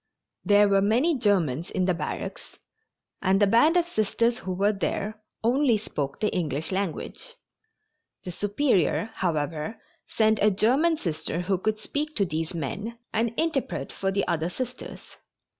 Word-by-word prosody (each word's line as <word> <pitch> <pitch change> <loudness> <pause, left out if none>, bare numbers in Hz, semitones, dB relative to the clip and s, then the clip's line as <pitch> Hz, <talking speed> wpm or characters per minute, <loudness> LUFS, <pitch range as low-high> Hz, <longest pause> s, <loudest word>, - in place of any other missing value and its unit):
There 205 0 +5
were 195 -1 +3
many 245 +11 +3
Germans 175 - +1
in 185 - 0
the 180 - +2
barracks, 170 - -5 0.6
and 195 0 +3
the 205 - +5
band 240 - +4
of 345 - +3
Sisters 235 - 0
who 190 - -5
were 200 +3 +2
there 210 +2 -3 0.2
only 245 0 +3
spoke 145 -9 -4
the 215 - 0
English 155 -2 -2
language. 195 - -4 0.9
The 180 - -5
Superior, 205 - +1
however, 155 +1 -2 0.3
sent 220 -1 +2
a 210 - +6
German 260 - +3
Sister 165 - -3
who 185 0 0
could 215 +2 -1
speak 300 +7 -3
to 200 - +2
these 160 0 -3
men 205 - -4 0.2
and 225 +1 +1
interpret 320 -5 -1
for 195 0 -1
the 195 0 0
other 165 +1 0
Sisters. 250 +5 -6
205 Hz, 150 wpm, -26 LUFS, 180-235 Hz, 0.9 s, a